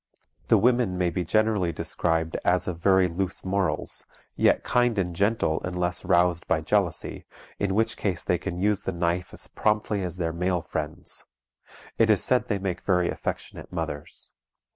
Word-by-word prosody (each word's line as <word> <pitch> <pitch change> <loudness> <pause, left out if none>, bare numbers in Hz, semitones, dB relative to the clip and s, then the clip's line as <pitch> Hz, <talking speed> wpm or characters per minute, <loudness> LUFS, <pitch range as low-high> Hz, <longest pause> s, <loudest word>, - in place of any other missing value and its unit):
The - - +6
women 120 -6 +2
may 90 -1 +1
be 90 +1 -1
generally 105 -1 +2
described 80 -1 -1
as 90 +1 +2
of 85 -2 -3
very 95 +1 +4
loose 90 +2 -3
morals, 95 0 0 0.3
yet - - +3
kind 120 -2 +2
and 90 -3 -1
gentle 100 -4 +1
unless 90 0 -2
roused 85 0 +2
by - - +2
jealousy, - - -1 0.3
in 100 -1 0
which 110 +1 +1
case 95 -4 -1
they 90 - +1
can 90 -3 -4
use 105 +2 +1
the 95 - -3
knife 85 +1 -1
as - - -6
promptly 105 -1 0
as 90 -1 -3
their 85 -2 -1
male 90 0 0
friends. 80 +3 -5 0.7
It 115 -1 +5
is 105 -3 +4
said 125 -1 +3
they 105 - 0
make 95 -2 -3
very 90 -3 +2
affectionate - - -5
mothers. 75 0 -6
90 Hz, 165 wpm, -26 LUFS, 85-100 Hz, 0.7 s, The